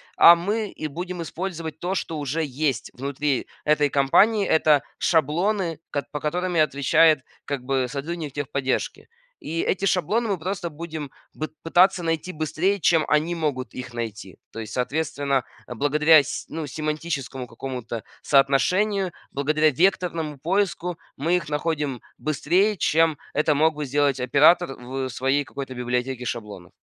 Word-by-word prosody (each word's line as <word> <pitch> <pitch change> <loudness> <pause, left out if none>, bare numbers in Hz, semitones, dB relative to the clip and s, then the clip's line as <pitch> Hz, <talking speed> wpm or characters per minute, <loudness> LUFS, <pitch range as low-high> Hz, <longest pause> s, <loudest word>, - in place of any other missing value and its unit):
а 170 - +9
мы 205 +5 -2
и 155 - -7
будем 175 +3 -5
использовать 165 -3 -5
то, 185 +2 -2
что 165 -4 -3
уже 145 +3 -1
есть 140 -3 -2
внутри 140 +1 -2 0.2
этой 150 -1 +3
компании. 195 +11 +4
Это 155 -3 +4 0.2
шаблоны, 170 +2 +1
ко 145 - -2
по 150 - -3
которым 175 +4 -2
и - - +3
отвечает, 155 +1 +4 0.2
как 140 -3 -3
бы, 130 -1 0
сотрудник 150 +2 -4
техподдержки. 140 -2 -2 0.3
И 165 +1 -3
эти 195 +1 0
шаблоны 195 +5 +1
мы 200 -3 0
просто 185 +1 -3
будем 160 -2 -6 0.2
б 155 - -4 0.2
пытаться 180 +2 +4
найти 165 +2 -1
быстрее, 170 +5 0
чем 165 -3 +3
они 155 +3 +2
могут 145 -6 -2
их 130 0 -7
найти. 110 -5 -6 0.2
То - - -6
есть, 110 -2 -6
соответственно, 140 0 -1 0.2
благодаря 150 +5 +4
с 140 - -5
ну, 160 -1 -5
семантическому 150 -3 -4
какому-то 120 -2 -6 0.2
соотношению, 180 +8 +2 0.2
благодаря 155 +2 +2
векторному 165 -2 0
поиску, 180 +1 -1 0.2
мы 170 +6 +2
их 160 -4 -5
находим 150 -4 -2 0.2
быстрее, 180 +8 +1
чем 160 -2 +2 0.2
это 150 0 +2
мог 160 +2 +3
бы 150 0 -4
сделать 140 0 +1
оператор 140 +4 +4
в 130 +1 -4
своей 135 +3 0
какой-то 135 -1 -7
библиотеке 125 +1 -2
шаблонов. 105 -7 -6
150 Hz, 145 wpm, -24 LUFS, 135-170 Hz, 0.3 s, а